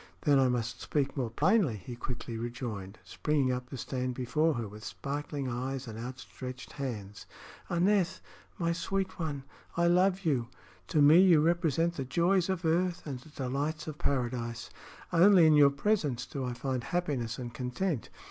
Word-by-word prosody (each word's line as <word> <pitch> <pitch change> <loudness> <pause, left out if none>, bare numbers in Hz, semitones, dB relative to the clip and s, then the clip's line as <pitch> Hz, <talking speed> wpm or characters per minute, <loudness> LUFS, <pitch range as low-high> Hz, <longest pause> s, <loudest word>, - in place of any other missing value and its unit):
"Then 145 -3 +4
I 130 - +4
must 115 -2 -2
speak 140 -2 -1
more 130 -5 -1
plainly," 160 - +2
he 105 +5 -8
quickly 120 -1 -5
rejoined, 115 -4 -5
springing 145 -4 0
up 125 0 -4
to 135 - -6
stand 125 0 -3
before 150 +6 +1
her 115 -2 -3
with 105 +2 -11
sparkling 140 +4 -4
eyes 130 +2 -3
and 110 0 -7
outstretched 130 +1 -7
hands. 105 -7 -6 0.4
"Aneth, 185 +1 +2 0.4
my 170 -1 0
sweet 190 +2 -2
one, 145 -5 -3 0.3
I 170 - +3
love 185 +2 +3
you! 130 -7 +1 0.4
To 155 -4 +3
me 155 +4 +8
you 180 -5 +6
represent 170 +1 +1
the 135 - -1
joys 175 +6 +2
of 185 -2 -1
earth 175 +2 +1
and 135 -4 -4
the 140 - -16
delights 145 +2 -3
of 155 -1 -7
paradise. 120 -3 -2 0.4
Only 180 0 +7
in 155 - +6
your 145 -1 +7
presence 140 - 0
do 135 -2 -4
I 125 - -2
find 130 -1 -2
happiness 145 -10 -1
and 120 -2 -6
content. 125 - -2
140 Hz, 165 wpm, -30 LUFS, 125-170 Hz, 0.4 s, me